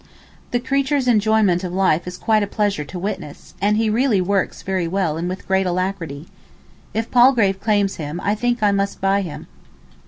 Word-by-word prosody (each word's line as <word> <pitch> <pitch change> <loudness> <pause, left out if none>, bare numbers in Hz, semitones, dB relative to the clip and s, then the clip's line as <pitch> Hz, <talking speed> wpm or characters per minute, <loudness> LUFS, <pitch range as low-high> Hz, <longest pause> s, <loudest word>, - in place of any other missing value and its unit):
The 245 - 0
creature's 275 +1 0
enjoyment 215 -5 +3
of 180 - -3
life 180 -3 +1
is 180 0 -6
quite 215 +1 +2
a 205 - -1
pleasure 205 -6 -1
to 175 +5 -8
witness, 180 -5 -6
and 205 +1 +2
he 225 0 +1
really 225 -1 +2
works 195 +1 -1
very 185 -3 -1
well 180 -3 -1
and 170 +2 -3
with 185 - -7
great 190 0 +2
alacrity. 175 -5 -3 0.6
If 225 +1 -3
Palgrave 240 -6 +4
claims 205 -2 +1
him 155 +2 -5
I 205 - +1
think 240 +1 -1
I 205 - +4
must 200 0 -1
buy 195 +1 +2
him. 175 -6 -7
195 Hz, 185 wpm, -20 LUFS, 180-220 Hz, 0.6 s, Palgrave